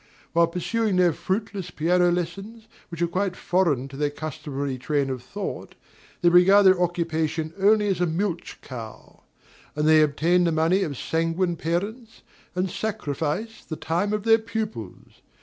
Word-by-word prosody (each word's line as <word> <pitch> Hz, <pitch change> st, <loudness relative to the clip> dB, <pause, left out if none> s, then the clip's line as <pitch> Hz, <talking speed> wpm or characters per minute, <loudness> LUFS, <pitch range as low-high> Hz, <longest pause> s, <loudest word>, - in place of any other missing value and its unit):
While 170 Hz, 0 st, +4 dB
pursuing 205 Hz, +5 st, -1 dB
their 180 Hz, -2 st, +4 dB
fruitless 195 Hz, 0 st, -3 dB
piano 175 Hz, +2 st, +2 dB
lessons, 195 Hz, +6 st, -4 dB, 0.2 s
which 170 Hz, -1 st, -3 dB
are -, -, +2 dB
quite 185 Hz, +2 st, -1 dB
foreign 165 Hz, -10 st, +1 dB
to 135 Hz, -, -10 dB
their 145 Hz, +1 st, 0 dB
customary 145 Hz, -3 st, -5 dB
train 140 Hz, 0 st, 0 dB
of 130 Hz, -2 st, -4 dB
thought, -, -, -6 dB, 0.5 s
they 175 Hz, -, +5 dB
regard 190 Hz, +4 st, +6 dB
their 185 Hz, -1 st, +6 dB
occupation 160 Hz, -2 st, -1 dB
only 210 Hz, +2 st, +4 dB
as 190 Hz, -3 st, 0 dB
a 180 Hz, -, +3 dB
milch 170 Hz, +1 st, -3 dB
cow; 115 Hz, -5 st, -10 dB, 0.5 s
and 150 Hz, +1 st, 0 dB
they 155 Hz, 0 st, +6 dB
obtain 165 Hz, +4 st, +2 dB
the 170 Hz, -, +2 dB
money 165 Hz, +5 st, +2 dB
of 145 Hz, -8 st, -2 dB
sanguine 165 Hz, +4 st, 0 dB
parents, 205 Hz, +9 st, -4 dB, 0.3 s
and 180 Hz, 0 st, -1 dB
sacrifice 215 Hz, 0 st, -3 dB
the 155 Hz, -, -6 dB
time 175 Hz, +6 st, -1 dB
of 210 Hz, -1 st, -1 dB
their 225 Hz, 0 st, +5 dB
pupils. 215 Hz, -, -6 dB
175 Hz, 155 wpm, -24 LUFS, 155-195 Hz, 0.5 s, regard